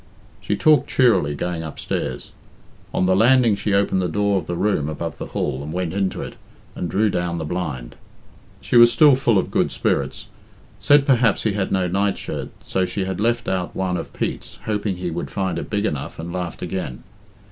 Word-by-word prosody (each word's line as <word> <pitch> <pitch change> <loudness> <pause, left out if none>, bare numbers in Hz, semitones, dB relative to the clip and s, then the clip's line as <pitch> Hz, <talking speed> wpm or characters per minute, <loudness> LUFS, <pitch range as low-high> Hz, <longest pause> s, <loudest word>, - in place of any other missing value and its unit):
She 100 +2 -1
talked 150 +8 +4
cheerily 115 - +3
going 85 +2 -3
upstairs. 80 -2 -4 0.6
On - - +1
the 95 0 +3
landing 120 +1 +5
she 100 0 -1
opened 100 -1 +2
the 90 - 0
door 100 +2 +1
of 80 - -9
the 85 - -2
room 85 -6 0
above 75 +1 -5
the - - -5
hall, 70 -2 -2
and 75 +2 -6
went 90 0 -2
into 95 -1 -1
it, - - -7 0.4
and 90 - -4
drew 105 +5 +2
down 85 -1 -1
the 80 - -3
blind. 75 -8 -4 0.7
She 120 - +2
was 120 0 +8
still 150 +2 +6
full 120 -5 +2
of 95 - 0
good - - +1
spirits, - - -1 0.5
said 145 -1 +5
perhaps 125 -6 +3
he 110 - +1
had 100 -2 -2
no 95 -1 +1
night 100 +2 0
shirt, - - -5 0.2
so 95 - 0
she 95 +1 -2
had 95 +1 -3
left 120 +2 +1
out 90 -2 -2
one 95 -1 -1
of - - -5
Pete's, - - -4
hoped 105 -1 -2
he 90 -3 -2
would 85 +2 -4
find 95 -4 -2
it - - -7
big 105 0 0
enough, 75 -9 -3
and 85 +2 -6
laughed 90 -2 -4
again. 90 -8 -4
95 Hz, 200 wpm, -22 LUFS, 85-105 Hz, 0.7 s, was